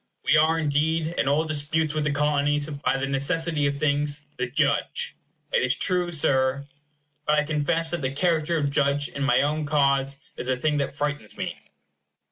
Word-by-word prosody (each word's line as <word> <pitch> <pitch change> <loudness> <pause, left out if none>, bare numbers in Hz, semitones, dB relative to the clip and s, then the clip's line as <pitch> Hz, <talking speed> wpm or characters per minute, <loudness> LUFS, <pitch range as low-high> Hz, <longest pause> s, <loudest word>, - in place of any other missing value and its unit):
We - - +4
are, 160 +2 +4
indeed, 160 +2 0
in - - +1
all 150 +3 +2
disputes 155 0 -1
with 155 -1 -1
the 150 - +1
Colonies, 145 0 +1
by 145 -2 -1
the 135 - -1
necessity 150 +2 +1
of 140 0 -2
things, 145 0 0
the 125 - -1
judge. - - 0 0.4
It - - +3
is 130 0 +2
true, 180 +2 +1
Sir. 140 -3 +1 0.6
But 150 0 +3
I 150 - +3
confess 160 +2 0
that 175 -2 -2
the 130 - 0
character 165 +2 +1
of 145 -2 0
judge 140 0 +1
in 140 - -7
my 130 -2 +3
own 150 +2 0
cause 140 -1 +1
is 125 - -3
a 130 - +1
thing 150 +3 0
that 140 -1 -2
frightens 145 -7 -3
me. - - -3
145 Hz, 185 wpm, -25 LUFS, 140-155 Hz, 0.6 s, We